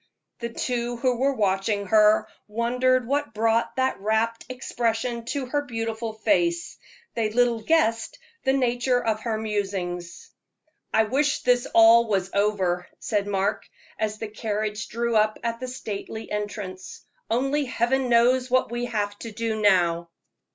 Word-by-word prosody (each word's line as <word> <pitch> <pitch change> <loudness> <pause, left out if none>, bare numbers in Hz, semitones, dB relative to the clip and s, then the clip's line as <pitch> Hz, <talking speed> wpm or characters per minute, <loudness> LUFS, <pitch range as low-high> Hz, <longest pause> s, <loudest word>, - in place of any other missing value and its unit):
The 235 - -3
two 240 0 -2
who 250 0 +1
were 270 +2 +1
watching 200 -1 0
her 215 +2 +4 0.2
wondered 250 +3 +1
what 280 -2 -1
brought 225 +1 +1
that 260 -4 0
rapt 220 +3 0
expression 235 -2 -2
to 275 +2 -3
that 290 +3 -2
beautiful 225 -1 -3
face. 340 +9 0 0.3
They 225 -2 0
little 235 0 +2
guessed 230 -7 +1 0.3
the 265 - +2
nature 245 -1 +1
of 220 -3 -1
her 220 -1 -2
musings. 195 -5 -4 0.6
"I 220 - +4
wish 275 +6 0
this 245 -1 +2
was 225 -4 +5
all 200 - +3
over," 185 -4 0
said 205 -5 -1
Mark, 200 +1 -1 0.3
as 215 -1 -1
the 220 - -5
carriage 215 -1 -3
drew 235 +1 -1
up 215 0 +3
at 230 0 -2
the 255 - -5
stately 220 -3 -6
entrance. 205 -3 -5 0.3
"Only 270 +5 +1
Heaven 255 +1 0
knows 250 +2 +4
what 255 -1 +2
we 240 0 -2
have 205 -3 -2
to 230 - -7
do 220 0 -2
now." 170 -4 +3
225 Hz, 145 wpm, -25 LUFS, 210-245 Hz, 0.6 s, was